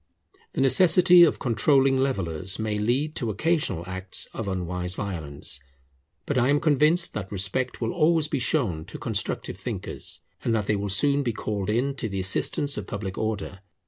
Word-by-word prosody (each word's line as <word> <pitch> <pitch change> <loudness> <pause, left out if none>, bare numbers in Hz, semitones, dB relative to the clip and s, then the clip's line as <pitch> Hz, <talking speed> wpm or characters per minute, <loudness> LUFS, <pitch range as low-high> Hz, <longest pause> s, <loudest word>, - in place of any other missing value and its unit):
The - - -1
necessity 175 +5 +6
of 170 - +5
controlling 135 +3 +2
levellers 95 - -1
may 110 -1 -2
lead 130 +8 0
to 115 - -2
occasional 145 - 0
acts 95 +1 -3
of 110 - -5
unwise 90 -1 -3
violence. 75 -9 -4 0.7
But 140 -3 0
I 125 +2 +2
am 145 +1 +3
convinced 155 +4 +3
that 100 -3 -5
respect 100 +8 -1
will 115 0 -1
always 160 -1 +3
be 145 -2 -2
shown 115 - 0
to - - -8
constructive - - -2
thinkers, - - -4 0.2
and 115 - +1
that 105 -2 0
they 105 - +1
will 100 0 -3
soon 140 +9 +3
be 120 -4 -1
called 105 -2 -3
in 125 +6 +1
to 115 - -3
the 95 -1 -3
assistance 140 +9 0
of 100 - -8
public 100 -2 -5
order. 105 -3 -3
110 Hz, 175 wpm, -25 LUFS, 95-140 Hz, 0.7 s, necessity